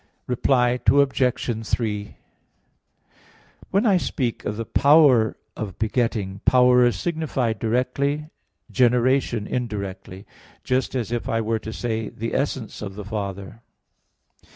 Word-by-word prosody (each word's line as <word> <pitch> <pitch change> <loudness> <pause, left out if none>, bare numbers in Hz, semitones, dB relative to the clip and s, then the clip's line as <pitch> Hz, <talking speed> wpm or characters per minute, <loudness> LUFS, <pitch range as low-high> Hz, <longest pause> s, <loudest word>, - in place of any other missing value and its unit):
Reply 125 0 +2
Obj. 125 -5 +1
3: 105 -3 -2 1.5
When 200 +5 +1
I 200 -4 +4
speak 125 -8 -2
of 105 - -3
the 115 - -3
"power 140 -5 +4 0.2
of 100 -5 -6
begetting," 110 -4 -1
power 125 -1 +5
is 120 - 0
signified 135 - -2
directly, 140 +6 -1 0.4
generation 125 -2 +2
indirectly: 100 -5 -5 0.4
just 130 +1 -1
as 120 -3 -2
if 120 -1 -3
I 115 - +1
were 110 0 -1
to 110 - -7
say, 110 -2 -3
the 115 +2 -5
"essence 135 -5 -2
of 95 -2 -6
the 105 -1 -7
Father." 100 0 -5
120 Hz, 120 wpm, -23 LUFS, 110-130 Hz, 1.5 s, power